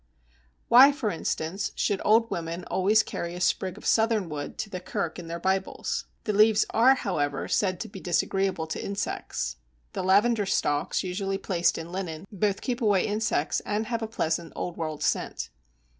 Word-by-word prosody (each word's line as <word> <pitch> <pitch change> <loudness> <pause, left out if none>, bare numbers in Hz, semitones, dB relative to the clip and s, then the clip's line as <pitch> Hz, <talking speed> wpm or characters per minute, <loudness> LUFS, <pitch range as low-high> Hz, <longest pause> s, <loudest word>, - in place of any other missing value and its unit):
Why, 265 +4 +9
for 255 -7 -2
instance, 165 +3 -2
should 200 - 0
old 225 +2 +4
women 170 +1 -3
always 210 +4 +4
carry 170 0 -5
a - - -6
sprig 185 0 0
of - - -12
Southernwood 205 -10 +1
to 215 - -4
the 185 - -4
kirk 170 -1 -3
in 170 - -8
their 170 +1 -4
Bibles? 190 +2 -1 0.2
The 210 - -1
leaves 215 +1 +5
are, 255 +4 +5
however, 145 - -2
said 185 -3 +1
to - - -4
be 195 - -10
disagreeable 185 0 0
to 160 - -5
insects. 195 - -3 0.4
The - - -2
Lavender 205 +3 +3
stalks 145 -4 0
usually 195 +1 -2
placed 175 -3 +1
in 165 +1 -7
linen 180 -2 -5
both 200 0 0
keep 250 -1 -2
away 205 -4 +3
insects 210 -7 0
and 210 +1 -2
have 230 0 -2
a 225 - -2
pleasant 165 -6 -2
old 175 - -4
world 155 -2 -4
scent. - - -1
190 Hz, 175 wpm, -27 LUFS, 170-215 Hz, 0.4 s, Why